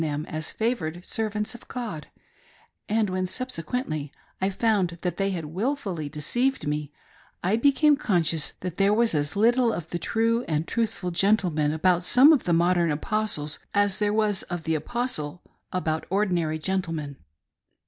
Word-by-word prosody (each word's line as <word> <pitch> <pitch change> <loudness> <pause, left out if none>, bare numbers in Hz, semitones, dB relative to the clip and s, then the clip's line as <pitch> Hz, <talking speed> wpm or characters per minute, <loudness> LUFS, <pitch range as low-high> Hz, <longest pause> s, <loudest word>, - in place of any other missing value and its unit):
them 150 -1 -2
as 155 0 -4
favored 180 -7 -2
servants 210 -1 -2
of 240 - -13
God; 220 - -5 0.8
and 220 0 +2
when 185 0 -1
subsequently 180 - -3 0.3
I 190 - +2
found 195 -4 +1
that 180 - -1
they 195 0 +1
had 175 -5 -3
wilfully 185 - -2
deceived 240 - -1
me 150 0 -2 0.5
I 190 +4 +2
became 285 +5 +4
conscious 165 - 0
that 180 -2 -5
there 200 +1 +4
was 230 -2 +2
as 145 +1 -1
little 235 +3 +4
of 165 -6 -5
the 175 - -3
true 230 +5 +1
and 155 0 -1
truthful 215 -5 -1
geritlepian 175 -5 +2
about 175 +3 +2
some 255 - +6
of 280 - +1
the 175 - +1
modern 170 0 +3
Apostles, 155 -2 -1 0.2
as 205 -1 +2
there 205 -1 +2
was 210 -2 +1
of 175 -2 -4
the 160 - 0
apos 240 - -2
tle 150 +3 -6 0.3
about 160 -3 -1
ordinary 175 -5 +1
gentlemen. 160 -5 -2
185 Hz, 160 wpm, -26 LUFS, 160-220 Hz, 0.8 s, some